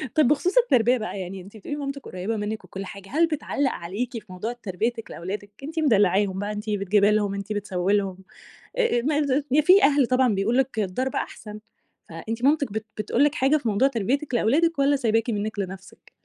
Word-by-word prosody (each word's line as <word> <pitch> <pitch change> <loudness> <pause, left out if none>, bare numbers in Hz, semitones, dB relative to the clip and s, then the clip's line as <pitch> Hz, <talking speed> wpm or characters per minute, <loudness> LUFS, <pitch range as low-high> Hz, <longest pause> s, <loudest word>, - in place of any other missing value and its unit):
طب 305 -5 +5
بخصوص 360 - +2
التربية 255 - +4
بقى 205 -2 -5
يعني، 185 +1 -6
أنتِ 200 +4 -13
بتقولي 290 +8 -6
لي - - -6
مامتك 275 -1 -5
قريبة 190 +5 -4
مِنِك 210 +1 -4
وكُلّ 195 +1 -7
حاجة، 195 -1 -10
هل 330 +4 +3
بتعلق 285 -3 -1
عليكِ 225 +8 -4
في 210 -4 -13
موضوع 215 +6 -4
تربيتِك 225 +1 -3
لأولادِك؟ 200 +4 -6
أنتِ 320 +3 -5
مدلعاهم 200 - +3
بقى، 205 +1 -3
أنتِ 210 +1 -5
بتجيبي 205 +1 +3
لهم، 205 -2 +1
أنتِ 200 +2 -4
بتسوي 195 -2 -1
لهم. 190 -2 -2 0.6
آآ 465 - +2
ما 295 +3 +1 0.3
د 295 - +5
في 380 +4 +6
أهل 285 -3 +5
طبعًا 255 -3 +3
بيقولوا 220 +6 +1
لكِ: 250 -4 -4
"الضرب 230 +7 -2
أحسن." 210 -1 -5 0.5
فأنتِ 220 +9 -6
مامتِك 285 -4 +2
بت 220 0 -3
بتقول 220 +6 +1
لِك 295 0 +2
حاجة 275 +4 +3
في 245 - -4
موضوع 215 +7 +3
تربيتِك 265 +4 -1
لأولادِك 290 +7 +2
والَّا 280 +1 +4
سايباكِ 225 -2 +1
منِك 210 -1 -2
لنفسِك؟ 190 0 -7
225 Hz, 195 wpm, -24 LUFS, 200-275 Hz, 0.6 s, في